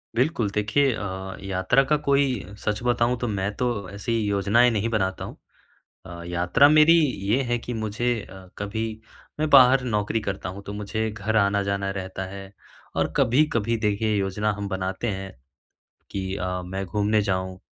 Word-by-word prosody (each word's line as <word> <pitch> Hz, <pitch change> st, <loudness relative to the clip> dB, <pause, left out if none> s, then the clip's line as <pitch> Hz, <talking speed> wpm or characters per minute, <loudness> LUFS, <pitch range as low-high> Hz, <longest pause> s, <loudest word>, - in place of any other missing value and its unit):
बिल्कुल 125 Hz, -5 st, +1 dB
देखिए 110 Hz, +7 st, +2 dB
अ, 95 Hz, -2 st, -5 dB
यात्रा 95 Hz, +8 st, +2 dB
का 150 Hz, -, +5 dB
कोई 140 Hz, 0 st, +4 dB, 0.4 s
सच 105 Hz, +1 st, -2 dB
बताऊँ 120 Hz, 0 st, +2 dB
तो 125 Hz, -, -2 dB
मैं 100 Hz, -1 st, -1 dB
तो 125 Hz, -, 0 dB, 0.2 s
ऐसी 105 Hz, +3 st, -2 dB
योजनाएँ 105 Hz, +4 st, +3 dB
नहीं 110 Hz, +1 st, 0 dB
बनाता 95 Hz, -4 st, -1 dB
हूँ। -, -, -9 dB, 0.7 s
अ, 85 Hz, -1 st, -9 dB
यात्रा 90 Hz, +11 st, +4 dB
मेरी 155 Hz, +2 st, +7 dB, 0.3 s
ये 125 Hz, +6 st, +3 dB
है 120 Hz, 0 st, 0 dB
कि 120 Hz, -, -6 dB
मुझे 110 Hz, +2 st, -2 dB, 0.2 s
अ, 95 Hz, -1 st, -12 dB
कभी 110 Hz, +2 st, -3 dB, 0.5 s
मैं 155 Hz, 0 st, +1 dB
बाहर 130 Hz, -1 st, +7 dB
नौकरी 105 Hz, -1 st, 0 dB
करता 100 Hz, -3 st, -4 dB
हूँ 100 Hz, +2 st, -8 dB
तो 100 Hz, -, -6 dB
मुझे 110 Hz, +2 st, -2 dB
घर 110 Hz, +1 st, -3 dB
आना-जाना 100 Hz, -1 st, +1 dB
रहता 95 Hz, 0 st, -5 dB
है 100 Hz, 0 st, -9 dB, 0.4 s
और -, -, 0 dB
कभी-कभी 115 Hz, -3 st, +2 dB
देखिए 105 Hz, 0 st, 0 dB
योजना 100 Hz, +2 st, 0 dB
हम 100 Hz, -1 st, -4 dB
बनाते 95 Hz, +4 st, -3 dB
हैं 95 Hz, -2 st, -4 dB, 0.8 s
कि 95 Hz, -1 st, -3 dB
अ, 90 Hz, 0 st, -3 dB
मैं 95 Hz, +2 st, -4 dB
घूमने 105 Hz, +3 st, +1 dB
जाऊँ। 95 Hz, -1 st, -2 dB
105 Hz, 165 wpm, -24 LUFS, 95-120 Hz, 0.8 s, मेरी